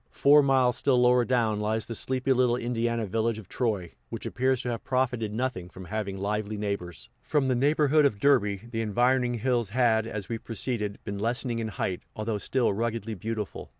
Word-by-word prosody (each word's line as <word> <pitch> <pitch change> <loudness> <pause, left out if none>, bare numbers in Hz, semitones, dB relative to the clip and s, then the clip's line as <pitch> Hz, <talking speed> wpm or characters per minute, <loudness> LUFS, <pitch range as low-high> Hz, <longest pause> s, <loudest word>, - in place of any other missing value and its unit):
Four 145 +1 +5
miles 130 -3 +3
still 130 -3 +3
lower 125 0 +4
down 115 -4 +1
lies 110 +1 -1
the 115 - -5
sleepy 130 +3 0
little 125 -1 +3
Indiana 115 -1 -1
village 115 +3 -1
of 110 -5 -10
Troy, 105 -9 -2 0.2
which - - -6
appears 130 0 0
to 125 - -2
have 115 -2 -4
profited 125 -4 0
nothing 110 -6 -3
from 95 +1 -10
having 100 0 -3
lively 105 +2 -2
neighbors. 90 -11 -4
From 145 -3 0
the 130 - +2
neighborhood 150 +3 +3
of 110 -8 +1
Derby, 105 -7 +3
the 115 -2 -2
environing 120 +3 +2
hills 120 -2 0
had, 115 -1 +2
as 105 -3 -5
we 115 -1 -3
proceeded, 110 -3 -3
been 100 -1 -5
lessening 120 +2 -1
in 115 - -2
height, 95 -3 -3
although 110 -1 -2
still 120 -1 +1
ruggedly 115 0 -2
beautiful. 105 +1 -5
115 Hz, 185 wpm, -27 LUFS, 105-125 Hz, 0.2 s, Four